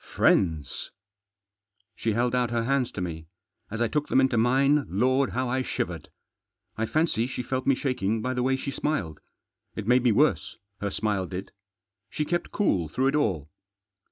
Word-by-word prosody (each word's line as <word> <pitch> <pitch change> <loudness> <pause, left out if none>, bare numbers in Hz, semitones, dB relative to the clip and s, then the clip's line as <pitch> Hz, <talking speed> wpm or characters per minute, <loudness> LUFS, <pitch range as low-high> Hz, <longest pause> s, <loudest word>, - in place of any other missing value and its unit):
" - - -15
Friends!" 80 -8 +2 1.1
She 115 - -1
held 120 +2 +1
out 125 -1 +1
her 115 -1 0
hands 130 0 +1
to 95 - -4
me. 80 -2 -5 0.4
As 115 +2 -4
I - - +2
took 150 +5 -1
them - - +3
into 130 -2 +3
mine, 135 +5 +3
Lord! 130 +7 +2
how 130 +1 -1
I 130 +2 0
shivered. - - -4 0.7
I 110 0 -1
fancy 155 -7 +1
she 125 -1 -4
felt 130 0 -3
me 135 - +5
shaking 115 -6 -1
by 130 +4 -2
the 125 - -1
way 130 +1 +2
she 140 +1 -4
smiled. 130 - -2 0.6
It - - -4
made 125 +3 +4
me 120 -1 +3
worse, 110 - +2 0.2
her 100 - -2
smile 100 -2 -1
did. 95 +2 -6 0.6
She 150 - -2
kept 175 +3 -2
cool 95 - +1
through 130 +9 +1
it 140 - -1
all. 90 - 0
125 Hz, 185 wpm, -26 LUFS, 100-135 Hz, 1.1 s, me